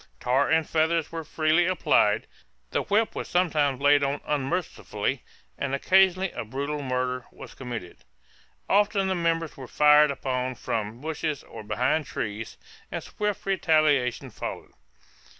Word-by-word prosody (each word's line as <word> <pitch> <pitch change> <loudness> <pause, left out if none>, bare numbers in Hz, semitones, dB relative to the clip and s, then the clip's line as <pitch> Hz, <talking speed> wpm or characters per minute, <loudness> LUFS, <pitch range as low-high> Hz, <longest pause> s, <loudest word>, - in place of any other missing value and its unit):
Tar 130 +3 +2
and 160 -1 +2
feathers 160 0 +1
were 165 -1 -4
freely 155 +3 +2
applied; 110 - +2 0.5
the - - +1
whip 215 +2 +1
was - - -5
sometimes 155 -7 +1
laid 145 0 +4
on 140 +1 0
unmercifully, 140 - -2 0.4
and 140 -1 -1
occasionally 190 +4 +3
a - - -5
brutal 140 +6 -4
murder 125 -1 -2
was - - -11
committed. 120 -9 -7 0.7
Often 200 -1 +2
the - - +2
members 165 -2 -1
were 130 -2 -8
fired 150 +2 +6
upon 130 -2 -2
from 110 +1 -4
bushes 155 -1 -3
or 115 - -10
behind 130 +7 0
trees, 105 +1 -5 0.3
and - - -4
swift 210 -1 -3
retaliation 155 -9 +2
followed. - - -6
150 Hz, 135 wpm, -26 LUFS, 130-165 Hz, 0.7 s, fired